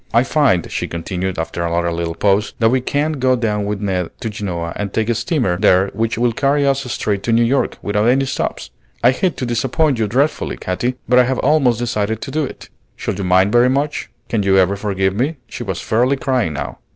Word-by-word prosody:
"I 120 Hz, -, +6 dB
find," 130 Hz, -, +1 dB
she -, -, -2 dB
continued 90 Hz, +2 st, -4 dB
after 80 Hz, +1 st, -3 dB
another 85 Hz, 0 st, 0 dB
little 85 Hz, 0 st, -3 dB
pause, 100 Hz, +4 st, +1 dB
"that 115 Hz, -1 st, +3 dB
we 130 Hz, 0 st, +2 dB
can 145 Hz, +4 st, 0 dB
go 130 Hz, 0 st, +3 dB
down 105 Hz, -4 st, -1 dB
with 105 Hz, 0 st, -3 dB
Ned 95 Hz, -4 st, -1 dB
to 115 Hz, -3 st, -3 dB
Genoa 85 Hz, -5 st, -4 dB
and 100 Hz, -2 st, -3 dB
take 110 Hz, +2 st, -1 dB
a -, -, +3 dB
steamer 115 Hz, -, 0 dB
there 95 Hz, -1 st, +3 dB
which 115 Hz, +2 st, -1 dB
will 120 Hz, 0 st, +2 dB
carry 140 Hz, +4 st, +1 dB
us 135 Hz, -2 st, 0 dB
straight 100 Hz, -4 st, -1 dB
to 115 Hz, -, -2 dB
New 115 Hz, +1 st, +4 dB
York 130 Hz, +4 st, +1 dB
without 105 Hz, +2 st, +1 dB
any 135 Hz, +3 st, +3 dB
stops. 130 Hz, -, -3 dB, 0.3 s
I 120 Hz, -, +6 dB
hate 175 Hz, +6 st, -1 dB
to 130 Hz, -, -2 dB
disappoint 130 Hz, +4 st, 0 dB
you 110 Hz, -, +1 dB
dreadfully, 135 Hz, +8 st, 0 dB
Katy, 120 Hz, +8 st, -2 dB
but 125 Hz, 0 st, +5 dB
I 125 Hz, -, +5 dB
have 130 Hz, +1 st, -1 dB
almost 135 Hz, -5 st, +3 dB
decided 110 Hz, -2 st, -1 dB
to -, -, -6 dB
do 155 Hz, 0 st, 0 dB
it. 135 Hz, -, -8 dB, 0.3 s
Shall -, -, -3 dB
you 100 Hz, +1 st, -4 dB
mind 95 Hz, +2 st, +3 dB
very 120 Hz, +2 st, +5 dB
much? 145 Hz, +3 st, -1 dB, 0.2 s
Can 115 Hz, -4 st, 0 dB
you 95 Hz, -1 st, +3 dB
ever 95 Hz, +1 st, +3 dB
forgive 95 Hz, -2 st, -1 dB
me?" 135 Hz, +10 st, -1 dB
She -, -, -9 dB
was 95 Hz, -6 st, -3 dB
fairly 125 Hz, +5 st, +2 dB
crying 125 Hz, -, 0 dB
now. 70 Hz, -, -5 dB
115 Hz, 225 wpm, -18 LUFS, 95-130 Hz, 0.3 s, I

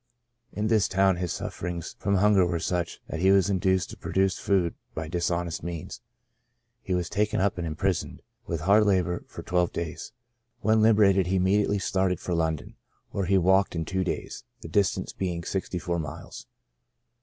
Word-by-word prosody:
In 105 Hz, -, -3 dB
this 110 Hz, -2 st, +3 dB
town 95 Hz, -1 st, +3 dB
his 90 Hz, -2 st, -2 dB
sufferings 85 Hz, -1 st, -5 dB
from 100 Hz, 0 st, +1 dB
hunger 100 Hz, 0 st, +4 dB
were 85 Hz, -1 st, 0 dB
such, 85 Hz, +1 st, -2 dB
that 80 Hz, -, -5 dB
he 95 Hz, +2 st, +4 dB
was 95 Hz, 0 st, +4 dB
induced 95 Hz, -1 st, +1 dB
to -, -, -10 dB
procure 95 Hz, 0 st, +1 dB
food 90 Hz, -2 st, 0 dB, 0.2 s
by 80 Hz, 0 st, -4 dB
dishonest 85 Hz, 0 st, -2 dB
means; 85 Hz, +6 st, -6 dB, 0.8 s
he 95 Hz, -, -2 dB
was 90 Hz, -2 st, -1 dB
taken 105 Hz, +2 st, 0 dB
up 95 Hz, -1 st, +1 dB
and 85 Hz, -, -2 dB
imprisoned, 85 Hz, +3 st, -2 dB, 0.2 s
with 85 Hz, -2 st, -3 dB
hard 105 Hz, +5 st, +4 dB
labor, 90 Hz, -3 st, +1 dB
for -, -, -9 dB
twelve 90 Hz, -1 st, +1 dB
days. 85 Hz, -2 st, -5 dB, 0.5 s
When 110 Hz, +1 st, +3 dB
liberated 100 Hz, -4 st, +4 dB
he 95 Hz, -, +1 dB
immediately 100 Hz, +2 st, +2 dB
started 95 Hz, -2 st, 0 dB
for 90 Hz, -, -3 dB
London, 80 Hz, -5 st, -2 dB, 0.3 s
where 100 Hz, -, -1 dB
he 95 Hz, +2 st, +3 dB
walked 95 Hz, +1 st, +3 dB
in 80 Hz, -1 st, -2 dB
two 95 Hz, +2 st, -1 dB
days, 90 Hz, -, -4 dB, 0.2 s
the -, -, -8 dB
distance 100 Hz, +3 st, 0 dB
being 90 Hz, -3 st, -3 dB
sixty 95 Hz, 0 st, -3 dB
four 85 Hz, 0 st, -2 dB
miles. 75 Hz, -3 st, -8 dB
95 Hz, 175 wpm, -27 LUFS, 85-100 Hz, 0.8 s, hunger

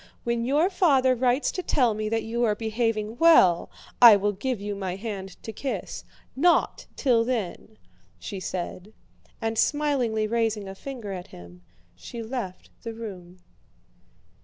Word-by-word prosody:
When 235 Hz, -1 st, -1 dB
your 300 Hz, +9 st, +2 dB
father 275 Hz, -9 st, +3 dB
writes 255 Hz, +2 st, +1 dB
to 365 Hz, -, -4 dB
tell 250 Hz, -9 st, +2 dB
me 215 Hz, 0 st, -3 dB
that 225 Hz, 0 st, -1 dB
you 235 Hz, +2 st, -2 dB
are 215 Hz, -3 st, +2 dB
behaving 225 Hz, 0 st, -2 dB
well 190 Hz, -, +5 dB, 0.3 s
I 235 Hz, -3 st, +11 dB
will 205 Hz, +1 st, +1 dB
give 240 Hz, +4 st, -3 dB
you 205 Hz, 0 st, -4 dB
my 190 Hz, -2 st, -4 dB
hand 195 Hz, -3 st, -6 dB
to 220 Hz, -, -6 dB
kiss. 265 Hz, +5 st, -5 dB, 0.3 s
Not 335 Hz, +6 st, +2 dB
till 240 Hz, -5 st, +2 dB
then!" 220 Hz, -3 st, -4 dB, 0.4 s
she 200 Hz, -, -6 dB
said. 185 Hz, +2 st, -5 dB, 0.5 s
And 225 Hz, 0 st, -1 dB
smilingly 265 Hz, -8 st, +1 dB
raising 220 Hz, -2 st, -1 dB
a 195 Hz, -, -6 dB
finger 235 Hz, -1 st, -7 dB
at 180 Hz, -2 st, -6 dB
him, 90 Hz, 0 st, -13 dB, 0.3 s
she 235 Hz, -2 st, -8 dB
left 220 Hz, -6 st, -6 dB
the 230 Hz, -1 st, -6 dB
room. 185 Hz, -5 st, -9 dB
225 Hz, 150 wpm, -26 LUFS, 200-250 Hz, 0.5 s, I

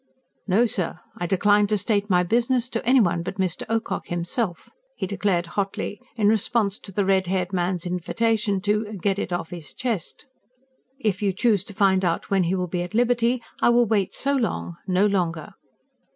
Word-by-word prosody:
"No, 205 Hz, +5 st, +4 dB
sir, 180 Hz, -6 st, -2 dB, 0.2 s
I 175 Hz, -, -2 dB
decline 205 Hz, +3 st, +3 dB
to 210 Hz, 0 st, +1 dB
state 205 Hz, +1 st, 0 dB
my 180 Hz, -2 st, +4 dB
business 240 Hz, +5 st, +1 dB
to 230 Hz, -, -3 dB
anyone 215 Hz, -9 st, +3 dB
but 180 Hz, +3 st, -5 dB
Mr. 185 Hz, -2 st, -1 dB
Ocock 225 Hz, 0 st, -2 dB
himself!" 175 Hz, +3 st, -2 dB, 0.3 s
he -, -, -3 dB
declared 190 Hz, -2 st, 0 dB
hotly, 200 Hz, +2 st, -3 dB, 0.2 s
in 210 Hz, -2 st, +3 dB
response 215 Hz, -1 st, +1 dB
to 195 Hz, -, -10 dB
the 200 Hz, +1 st, 0 dB
red 190 Hz, -1 st, +2 dB
haired 185 Hz, 0 st, -1 dB
man's 180 Hz, -1 st, -1 dB
invitation 205 Hz, +3 st, 0 dB
to 210 Hz, +1 st, 0 dB
"get 195 Hz, +2 st, 0 dB
it -, -, -3 dB
off 175 Hz, -2 st, -3 dB
his 170 Hz, -4 st, -8 dB
chest." 230 Hz, -9 st, -3 dB, 0.7 s
"If 210 Hz, -6 st, -1 dB
you 200 Hz, -2 st, +1 dB
choose 210 Hz, -1 st, +2 dB
to 205 Hz, -, -8 dB
find 190 Hz, -2 st, +3 dB
out 170 Hz, +1 st, -1 dB
when 190 Hz, -2 st, +3 dB
he 180 Hz, +3 st, +1 dB
will 180 Hz, -1 st, -1 dB
be 175 Hz, 0 st, -3 dB
at 180 Hz, +4 st, -5 dB
liberty, 240 Hz, 0 st, +2 dB, 0.2 s
I -, -, +5 dB
will 240 Hz, 0 st, +5 dB
wait 205 Hz, -3 st, 0 dB
so 280 Hz, +1 st, 0 dB
long 225 Hz, -8 st, -1 dB
no 185 Hz, +2 st, +3 dB
longer." 175 Hz, -6 st, -1 dB
200 Hz, 185 wpm, -24 LUFS, 180-220 Hz, 0.7 s, I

